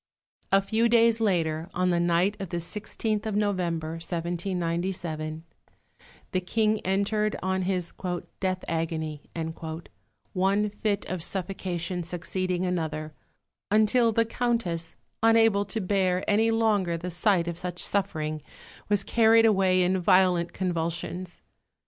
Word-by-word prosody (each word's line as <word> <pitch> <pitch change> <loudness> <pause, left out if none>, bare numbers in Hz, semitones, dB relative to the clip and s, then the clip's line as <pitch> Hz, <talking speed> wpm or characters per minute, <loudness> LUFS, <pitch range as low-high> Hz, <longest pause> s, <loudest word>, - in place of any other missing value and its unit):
A 195 0 +5
few 225 +3 +2
days 230 -1 +4
later, 165 -5 0
on 180 0 +2
the 175 - +2
night 175 +4 +2
of 195 -3 -5
the 175 - -3
16th 210 +4 -3
of 215 - -2
November 170 -6 -1
(1797), 170 -2 -3 0.9
the 185 - 0
King 215 +3 +1
entered 210 +3 0
on 190 0 0
his 180 -2 -2 0.5
"death 185 -1 -1
agony," 160 -2 -2 1.1
one 200 +3 +2
fit 205 -1 -1
of 185 -2 -4
suffocation 180 -1 -2
succeeding 180 +1 -2
another, 155 -3 -2 0.6
until 220 +3 +4
the 230 +1 +2
Countess, 225 -9 -1 0.3
unable 225 -2 +4
to 225 - -3
bear 185 -2 0
any 220 +2 +3
longer 210 -6 +2
the 180 +2 -5
sight 180 -1 +2
of 170 0 -3
such 180 -1 -4
suffering, 155 -7 -1 0.5
was 205 -1 +4
carried 225 0 +5
away 190 -4 +4
in 185 +1 +1
violent 180 -1 +3
convulsions. 175 0 -3
185 Hz, 125 wpm, -27 LUFS, 170-210 Hz, 1.1 s, A